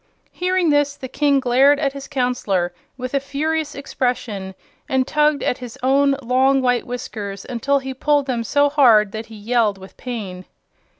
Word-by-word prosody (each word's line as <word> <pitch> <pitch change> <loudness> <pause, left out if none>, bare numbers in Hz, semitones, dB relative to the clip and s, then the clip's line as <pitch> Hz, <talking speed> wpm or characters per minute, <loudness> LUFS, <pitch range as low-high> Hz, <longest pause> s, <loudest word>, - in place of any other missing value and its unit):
Hearing 360 -2 +1
this, 290 -1 +2
the 260 - -7
King 285 +1 +2
glared 265 +3 +4
at 275 -2 0
his 275 -1 -8
Counselor 245 - -1 0.2
with 255 0 -5
a 275 - +2
furious 300 +2 -2
expression 240 -8 -3 0.3
and 260 -1 +2
tugged 300 -1 +2
at 250 - -1
his 250 0 -9
own 275 +1 +3
long 260 +3 +3
white 245 -2 +1
whiskers 210 -5 -6
until 265 +3 0
he 265 -1 -4
pulled 290 +2 +1
them 245 -4 -2
so 285 +5 +3
hard 235 -8 +5
that 220 +1 -6
he 225 - -12
yelled 215 -1 +1
with 190 0 -13
pain. 200 -7 -6
260 Hz, 170 wpm, -20 LUFS, 230-280 Hz, 0.3 s, hard